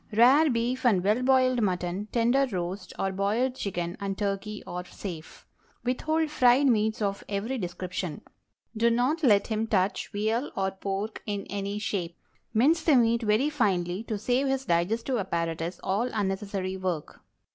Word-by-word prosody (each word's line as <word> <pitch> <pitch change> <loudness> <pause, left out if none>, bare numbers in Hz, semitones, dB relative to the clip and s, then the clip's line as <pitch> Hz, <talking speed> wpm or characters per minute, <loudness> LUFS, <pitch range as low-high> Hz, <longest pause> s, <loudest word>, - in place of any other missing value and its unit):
Rare 265 +8 +6
beef 245 +2 -1
and 205 -8 +3
well 210 +5 +2
boiled 255 -1 +3
mutton, 185 0 -1
tender 245 +4 +3
roast 185 +1 -4
or 195 - -1
boiled 210 +7 0
chicken 175 -7 -3
and 195 -1 -3
turkey 205 +1 -3
are 180 0 -5
safe. 175 -2 -9 0.4
Withhold 310 +5 0
fried 255 -1 +4
meats 220 -3 +2
of 200 -1 -2
every 215 +6 -2
description. 180 -3 -4 0.5
Do 230 +2 +3
not 250 +8 +1
let 210 -8 +4
him 220 0 -1
touch 195 -2 +1
veal 220 +5 -1
or 190 0 0
pork 195 +3 -4
in 205 -1 -3
any 200 0 -3
shape. 185 -5 -3 0.3
Mince 285 +9 +3
the 315 -3 +4
meat 235 -1 +3
very 225 +7 +2
finely 190 -8 0
to 220 - -2
save 250 +6 +1
his 270 0 -1
digestive 220 +9 0
apparatus 170 -2 -2
all 205 +6 0
unnecessary 195 -2 -2
work. 180 -5 -4
210 Hz, 155 wpm, -27 LUFS, 190-245 Hz, 0.5 s, Rare